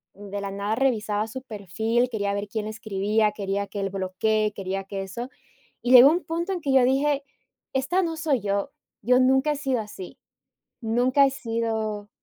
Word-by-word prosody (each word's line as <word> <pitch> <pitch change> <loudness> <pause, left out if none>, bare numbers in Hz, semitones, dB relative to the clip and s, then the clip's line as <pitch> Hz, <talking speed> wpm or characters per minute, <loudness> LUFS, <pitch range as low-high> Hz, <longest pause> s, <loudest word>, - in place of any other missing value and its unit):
de 200 0 -6
la 200 - -4
nada 200 +2 -2
revisaba 220 -4 0
su 260 +4 -7
perfil, 225 +3 -1
quería 200 -3 -1
ver 200 +1 -3
quién 210 +1 -4
escribía, 215 0 0
quería 200 -1 -3
que 205 - -6
él 195 -1 -2
bloquee, 210 +3 0
quería 195 0 -3
que 195 0 -5
eso, 235 +7 -6 0.5
y 250 - 0
llegó 255 +3 +10
un 350 +3 0
punto 340 +4 -3
en 360 - -3
que 275 -3 0
yo 260 -2 +6
dije: 280 +2 +1 0.5
"Esta 270 +9 +1
no 325 -2 -2
soy 290 -8 0
yo, 200 0 -1 0.3
yo 250 +4 +3
nunca 265 +3 +3
he - - -3
sido 265 -4 -1
así, 205 -3 -9 0.6
nunca 250 +5 +3
he - - +1
sido", 225 -4 -3
220 Hz, 180 wpm, -25 LUFS, 200-265 Hz, 0.6 s, llegó